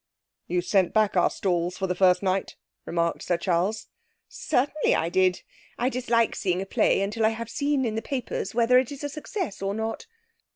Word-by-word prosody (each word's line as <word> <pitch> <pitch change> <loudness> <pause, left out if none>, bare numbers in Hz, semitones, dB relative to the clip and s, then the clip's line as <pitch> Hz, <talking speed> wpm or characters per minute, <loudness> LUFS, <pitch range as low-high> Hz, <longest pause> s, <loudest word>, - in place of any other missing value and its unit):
'You 175 +1 0
sent 190 -1 +1
back 215 -2 +3
our 180 - +4
stalls 175 -1 -1
for 190 - -1
the 180 - 0
first 180 0 +3
night,' 190 0 -1 0.3
remarked 170 0 -1
Sir 175 - 0
Charles. 185 +5 0 0.4
'Certainly 285 +4 0
I 165 - 0
did. 185 0 +2 0.3
I 245 +2 +1
dislike 235 -3 +1
seeing 180 -2 -1
a 195 - -3
play 195 - +2
until 210 +3 -2
I 220 - +5
have 230 +1 -6
seen 285 -2 0
in 225 - -1
the 225 - -2
papers 235 -6 -4
whether 240 +2 +5
it 255 0 -2
is 285 0 -8
a 290 - -2
success 305 - -5
or 195 +1 -2
not.' 225 - -4
210 Hz, 195 wpm, -26 LUFS, 185-245 Hz, 0.4 s, I